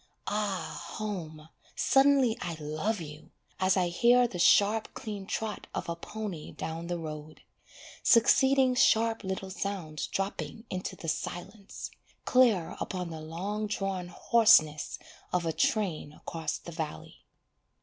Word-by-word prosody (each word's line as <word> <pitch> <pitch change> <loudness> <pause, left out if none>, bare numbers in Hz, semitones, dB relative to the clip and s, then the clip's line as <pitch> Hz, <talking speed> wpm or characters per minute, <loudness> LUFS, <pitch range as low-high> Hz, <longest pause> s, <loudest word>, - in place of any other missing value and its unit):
Ah 205 -2 -2
home, 160 -8 -5 0.3
suddenly 270 -4 +4
I 170 -2 -3
love 155 +8 -2
you, 150 -2 -9 0.3
As 185 +1 +3
I 180 -2 +2
hear 245 +7 +4
the 180 -6 -7
sharp 210 +5 +4
clean 205 -3 -6
trot 220 0 -3
of - - -3
a 170 - -2
pony 195 -2 -6
down 160 +2 -5
the 175 0 -2
road, 155 -1 -8 0.6
Succeeding 265 +2 +5
sharp 225 -3 +3
little 190 0 -4
sounds 185 -6 -4
dropping 200 +3 -4
into 185 0 -4
the 165 - -9
silence, 195 +5 -5 0.3
Clear 235 -10 +3
upon 180 -2 -4
the 160 -1 -6
long 195 +7 -3
drawn 195 -3 -2
hoarseness 175 -8 +4 0.3
of 180 -1 0
a 165 - 0
train 165 -3 0
across 160 -1 -4
the 170 - -10
valley. 160 -2 -6
190 Hz, 130 wpm, -29 LUFS, 165-220 Hz, 0.6 s, Succeeding